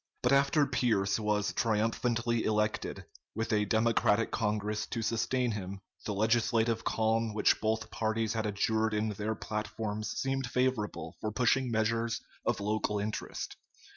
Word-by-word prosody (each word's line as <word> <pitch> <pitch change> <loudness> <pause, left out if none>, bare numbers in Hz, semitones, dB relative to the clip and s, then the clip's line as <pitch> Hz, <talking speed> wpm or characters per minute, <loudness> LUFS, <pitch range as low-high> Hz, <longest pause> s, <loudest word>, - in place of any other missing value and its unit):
But - - +3
after 140 +2 +4
Pierce 115 -7 +1
was 105 -1 0
triumphantly 115 +1 +1
elected, 105 0 -1 0.3
with 115 0 -1
a 105 0 +3
Democratic 110 0 +2
Congress 105 -1 -1
to 115 - -3
sustain 120 +2 0
him, 100 -2 -5 0.3
the 105 - -1
legislative 115 +1 +2
calm 110 0 +1
which 105 - +3
both 110 0 -1
parties 110 0 0
had 110 -1 -1
adjured 110 +2 +1
in 105 +1 0
their 105 +1 -2
platforms 105 0 -3
seemed 135 -1 -1
favorable 125 -4 -1
for 110 - -2
pushing 125 +3 +2
measures 115 +1 0 0.2
of - - 0
local 105 0 0
interest. 105 +1 -4
110 Hz, 140 wpm, -31 LUFS, 105-115 Hz, 0.3 s, after